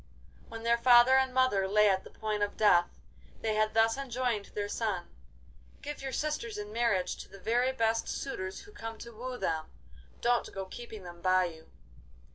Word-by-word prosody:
When 225 Hz, 0 st, -8 dB
their 235 Hz, 0 st, +3 dB
father 240 Hz, +1 st, +7 dB
and 265 Hz, -1 st, +3 dB
mother 255 Hz, -7 st, +2 dB
lay 210 Hz, +2 st, +4 dB
at 190 Hz, -1 st, +2 dB
the -, -, -12 dB
point 215 Hz, -1 st, -3 dB
of 205 Hz, 0 st, -1 dB
death, 175 Hz, -5 st, +5 dB, 0.5 s
they 220 Hz, -1 st, 0 dB
had 215 Hz, 0 st, +1 dB
thus 225 Hz, +2 st, +4 dB
enjoined 245 Hz, -5 st, -1 dB
their 205 Hz, -1 st, -1 dB
son: 205 Hz, -4 st, -2 dB, 0.8 s
'Give 295 Hz, 0 st, -6 dB
your 270 Hz, 0 st, -4 dB
sisters 255 Hz, -6 st, -2 dB
in 210 Hz, 0 st, -6 dB
marriage 225 Hz, -6 st, +1 dB
to -, -, -10 dB
the 195 Hz, -, -12 dB
very 240 Hz, +6 st, +1 dB
first 230 Hz, -3 st, 0 dB
suitors 190 Hz, -9 st, -4 dB
who 410 Hz, -, -15 dB
come 225 Hz, -, -7 dB
to 235 Hz, -, -9 dB
woo 250 Hz, +3 st, -6 dB
them. 160 Hz, -7 st, -2 dB, 0.5 s
Don't 240 Hz, 0 st, +1 dB
go 195 Hz, -1 st, -5 dB
keeping 220 Hz, 0 st, -9 dB
them 175 Hz, -1 st, -10 dB
by 185 Hz, 0 st, +3 dB
you! 160 Hz, -2 st, -9 dB
225 Hz, 185 wpm, -31 LUFS, 195-245 Hz, 0.8 s, father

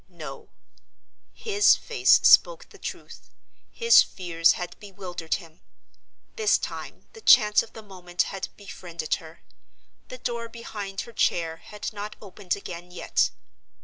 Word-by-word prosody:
No: -, -, -10 dB, 0.8 s
his 410 Hz, -2 st, +3 dB
face -, -, +3 dB
spoke -, -, +5 dB
the -, -, -16 dB
truth—his 465 Hz, 0 st, 0 dB
fears 170 Hz, -3 st, +1 dB
had 175 Hz, -1 st, -6 dB
bewildered 185 Hz, -5 st, -5 dB
him. 165 Hz, -2 st, -12 dB, 0.8 s
This 435 Hz, -2 st, +3 dB
time -, -, -7 dB
the 450 Hz, -, -13 dB
chance 210 Hz, -, +6 dB
of -, -, -12 dB
the 220 Hz, -, -10 dB
moment 180 Hz, -3 st, -3 dB
had 195 Hz, -, -4 dB
befriended 170 Hz, -5 st, -6 dB
her. 160 Hz, +1 st, -14 dB, 0.6 s
The 255 Hz, -, -9 dB
door 235 Hz, -2 st, -4 dB
behind 205 Hz, -4 st, -6 dB
her 235 Hz, -, -11 dB
chair 165 Hz, -6 st, 0 dB
had 210 Hz, +5 st, -7 dB
not 210 Hz, +1 st, -6 dB
opened 195 Hz, -2 st, -4 dB
again 175 Hz, -3 st, -9 dB
yet. 180 Hz, -, 0 dB
195 Hz, 130 wpm, -25 LUFS, 175-230 Hz, 0.8 s, chance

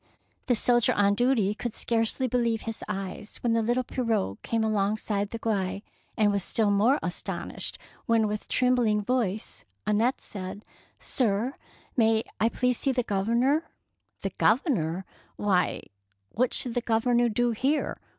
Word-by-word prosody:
The 245 Hz, -, +3 dB
soldier 240 Hz, +1 st, +3 dB
on 200 Hz, 0 st, +3 dB
duty 225 Hz, -3 st, +2 dB
could 230 Hz, +1 st, -5 dB
scarcely 230 Hz, +3 st, 0 dB
believe 235 Hz, -2 st, 0 dB
his 225 Hz, -1 st, -5 dB
eyes 195 Hz, 0 st, -5 dB
when 235 Hz, -2 st, +2 dB
the 230 Hz, -, +2 dB
little 240 Hz, +3 st, +1 dB
pirogue 225 Hz, -, -1 dB
came 225 Hz, -1 st, -1 dB
alongside 205 Hz, -1 st, 0 dB
the 230 Hz, -, -5 dB
quay, 200 Hz, -3 st, -2 dB, 0.3 s
and 210 Hz, -1 st, +4 dB
was 200 Hz, -2 st, 0 dB
still 215 Hz, +1 st, +2 dB
more 220 Hz, +8 st, +4 dB
astonished -, -, -4 dB, 0.3 s
when 225 Hz, -1 st, +3 dB
with 210 Hz, 0 st, -4 dB
trembling 245 Hz, -5 st, +2 dB
voice 220 Hz, -4 st, -1 dB, 0.2 s
Annette 220 Hz, +5 st, +2 dB
said, 195 Hz, +1 st, -7 dB
— -, -, -28 dB
" -, -, -40 dB
Sir, 235 Hz, +1 st, 0 dB, 0.4 s
may 225 Hz, -2 st, +3 dB, 0.2 s
I 225 Hz, -, +3 dB
please 250 Hz, +1 st, +1 dB
see 275 Hz, -, +2 dB
the 250 Hz, -1 st, 0 dB
Grovernor?^' 235 Hz, +9 st, +1 dB, 0.3 s
" -, -, -46 dB
The -, -, -1 dB
Governor! 195 Hz, -, +1 dB, 0.3 s
why, 190 Hz, -4 st, +1 dB, 0.5 s
what 250 Hz, +2 st, +1 dB
should 245 Hz, -, -1 dB
the 245 Hz, -, 0 dB
Governor 240 Hz, +1 st, +2 dB
do 240 Hz, +2 st, +1 dB
here? 270 Hz, +7 st, 0 dB
225 Hz, 155 wpm, -27 LUFS, 205-245 Hz, 0.5 s, and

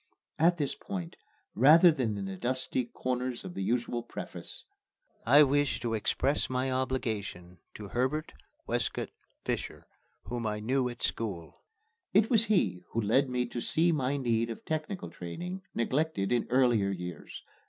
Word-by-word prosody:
At 170 Hz, +2 st, +4 dB
this 145 Hz, -4 st, -1 dB
point, 90 Hz, -4 st, -6 dB, 0.4 s
rather 160 Hz, -, +7 dB
than 120 Hz, -9 st, -1 dB
in 100 Hz, -, -3 dB
the 95 Hz, 0 st, -5 dB
dusty 130 Hz, +3 st, -1 dB
corners 125 Hz, 0 st, -3 dB
of 185 Hz, -, -6 dB
the -, -, -4 dB
usual 120 Hz, +3 st, 0 dB
preface, -, -, -8 dB, 0.6 s
I 150 Hz, +1 st, +8 dB
wish 145 Hz, 0 st, +2 dB
to 115 Hz, -1 st, -1 dB
express 135 Hz, +6 st, +1 dB
my 130 Hz, +1 st, 0 dB
obligation 110 Hz, -9 st, -3 dB, 0.2 s
to 105 Hz, -2 st, -8 dB
Herbert 130 Hz, +7 st, -1 dB, 0.3 s
Wescott -, -, -1 dB, 0.4 s
Fisher, -, -, -3 dB, 0.4 s
whom 120 Hz, -2 st, -3 dB
I 105 Hz, 0 st, -2 dB
knew 125 Hz, +3 st, +1 dB
at 120 Hz, 0 st, -8 dB
school. 95 Hz, -8 st, -3 dB, 0.5 s
It 215 Hz, +3 st, +5 dB
was 225 Hz, -2 st, +5 dB
he 100 Hz, -, +2 dB
who 115 Hz, -, +1 dB
led 120 Hz, +6 st, +3 dB
me 125 Hz, -1 st, 0 dB
to 120 Hz, -, -4 dB
see 170 Hz, +7 st, +2 dB
my 140 Hz, -2 st, 0 dB
need 115 Hz, -3 st, +1 dB
of 115 Hz, -, -7 dB
technical 160 Hz, +4 st, -3 dB
training, 175 Hz, -, -6 dB
neglected 130 Hz, -3 st, 0 dB
in 120 Hz, -1 st, +1 dB
earlier 120 Hz, -6 st, +3 dB
years. 90 Hz, -4 st, -6 dB
125 Hz, 155 wpm, -30 LUFS, 110-145 Hz, 0.6 s, I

